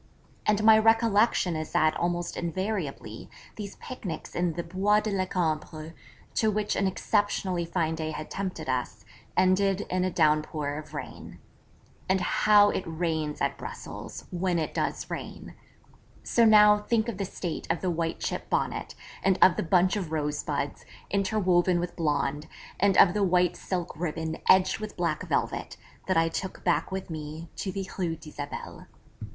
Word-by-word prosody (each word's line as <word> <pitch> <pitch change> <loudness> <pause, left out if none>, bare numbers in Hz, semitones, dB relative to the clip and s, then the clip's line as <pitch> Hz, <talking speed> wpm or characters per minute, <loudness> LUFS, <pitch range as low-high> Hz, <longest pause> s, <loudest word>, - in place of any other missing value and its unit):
And 215 0 +3
my 220 0 +8
recollection 225 -5 +3
is 155 0 -5
that 155 0 +3
almost 175 0 -1
invariably 170 - -4 0.3
these 205 -2 -7
picnics 185 -11 -7
in 175 -1 0
the 170 +2 -4
Bois 195 +5 +2
de 215 - -3
la 190 -1 0
Cambre, 160 -2 -2 0.4
to 220 - +2
which 210 0 -1
an 195 - +1
exceptionally 190 -2 0
fine 165 -2 -1
day 160 -1 -3
had 155 0 -6
tempted 185 -6 -4
us, 130 -1 -3 0.3
ended 190 +1 +3
in 185 0 +1
a 185 - +1
downpour 155 -3 +1
of 155 0 -11
rain. - - -8 0.7
And 190 0 +3
how 205 +2 +5
it - - -2
rains 160 -2 -2
at - - -1
Brussels, - - -8
when 180 0 0
it 160 - -2
does - - -2
rain! - - -7 0.7
So 235 - +3
now, 210 -1 +7
think 220 +1 0
of 220 -5 -4
the - - 0
state 175 -2 -5
of 165 0 0
the 185 - 0
white 165 -1 -2
chip - - -4
Bonnet, - - -1 0.3
and 190 -1 +3
of 185 - +6
the - - -1
bunch 180 +3 +3
of 180 -6 -4
rosebuds, 150 -2 -2 0.3
interwoven 185 -3 +2
with 175 0 -4
blonde, 150 -2 -1 0.3
and 195 0 +3
of 175 - +7
the 210 - +1
white 180 -1 +3
silk 180 -2 -4
ribbon 160 -1 -3
edged 185 0 +5
with 215 -1 -7
black - - -1
velvet, - - -1 0.3
that 185 - +2
I 165 0 +4
took 185 +3 -5
back 175 +1 +1
with 190 -2 -4
me 155 +1 -6
to 190 - -3
the 195 0 -4
Rue 170 -3 0
d'Isabelle. 150 -2 -8
180 Hz, 165 wpm, -27 LUFS, 160-195 Hz, 0.7 s, my